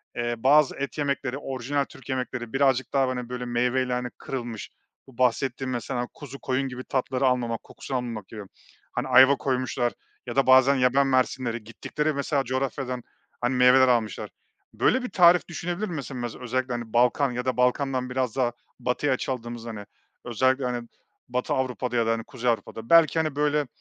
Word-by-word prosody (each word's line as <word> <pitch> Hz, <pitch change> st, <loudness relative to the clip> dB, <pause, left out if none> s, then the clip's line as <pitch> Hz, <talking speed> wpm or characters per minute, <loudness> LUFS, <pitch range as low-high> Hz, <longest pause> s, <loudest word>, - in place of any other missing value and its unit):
eee, 120 Hz, 0 st, -1 dB
bazı 140 Hz, +5 st, +4 dB
et 140 Hz, +2 st, -4 dB
yemekleri 140 Hz, -3 st, -1 dB
orijinal 135 Hz, +1 st, -2 dB
Türk 135 Hz, -, -15 dB
yemekleri 125 Hz, -2 st, -3 dB
birazcık 135 Hz, -2 st, +2 dB
daha, 130 Hz, -3 st, 0 dB
böyle, 125 Hz, 0 st, -4 dB
meyveyle 125 Hz, +1 st, 0 dB, 0.2 s
kırılmış 120 Hz, -4 st, -5 dB, 0.4 s
bu 130 Hz, -3 st, -17 dB
bahsettiğim 130 Hz, +1 st, 0 dB
mesela 120 Hz, 0 st, -3 dB
kuzu 140 Hz, -2 st, -10 dB
koyun 135 Hz, +1 st, -1 dB
gibi 130 Hz, 0 st, -7 dB
tatları 130 Hz, 0 st, -1 dB
almamak, 120 Hz, -3 st, 0 dB
kokusu 135 Hz, -, -7 dB
almamak 115 Hz, -5 st, -4 dB
gibi. 110 Hz, -, -8 dB, 0.5 s
Hani, 125 Hz, +2 st, -2 dB
ayva 130 Hz, +2 st, +7 dB
koymuşlar 130 Hz, -2 st, -1 dB, 0.3 s
ya 120 Hz, -, -6 dB
da 135 Hz, -1 st, +3 dB
bazen 130 Hz, +1 st, +6 dB
yaban 130 Hz, +2 st, +3 dB
mersinleri... 130 Hz, -3 st, 0 dB
Gittikleri 150 Hz, +7 st, -3 dB
mesela 140 Hz, 0 st, 0 dB
coğrafyadan, 130 Hz, -1 st, -3 dB, 0.4 s
hani, 120 Hz, +2 st, 0 dB
meyveler 125 Hz, +1 st, +6 dB
almışlar. 115 Hz, -5 st, 0 dB, 0.4 s
Böyle 255 Hz, 0 st, +2 dB
bir 250 Hz, -, -4 dB
tarif 180 Hz, -2 st, +5 dB
düşünebilir 175 Hz, +4 st, -3 dB
mi? 175 Hz, -, -5 dB
Mese 140 Hz, -2 st, -5 dB
mez 120 Hz, -3 st, -4 dB
özellikle 125 Hz, -2 st, -3 dB
Balkan 125 Hz, +3 st, +3 dB
ya 125 Hz, 0 st, -4 dB
da 130 Hz, -2 st, -1 dB
Balkan'dan 125 Hz, 0 st, +1 dB
biraz 125 Hz, -2 st, -1 dB
daha 125 Hz, -3 st, +1 dB, 0.3 s
batıya 125 Hz, +3 st, 0 dB
açıldığımız, 120 Hz, -3 st, -4 dB
hani, 110 Hz, -3 st, -7 dB, 0.4 s
özellikle, 130 Hz, +3 st, +1 dB
hani, 120 Hz, -1 st, -3 dB, 0.4 s
Batı 125 Hz, +1 st, -1 dB
Avrupa'da 125 Hz, -1 st, -2 dB
ya 115 Hz, -1 st, +2 dB
da, 115 Hz, -, +2 dB
hani, 115 Hz, 0 st, -1 dB
Kuzey 125 Hz, +1 st, -2 dB
Avrupa'da 115 Hz, 0 st, -5 dB
belki, 165 Hz, -1 st, +6 dB
hani, 155 Hz, -3 st, -1 dB
böyle 150 Hz, -1 st, +1 dB
130 Hz, 165 wpm, -26 LUFS, 120-135 Hz, 0.5 s, ayva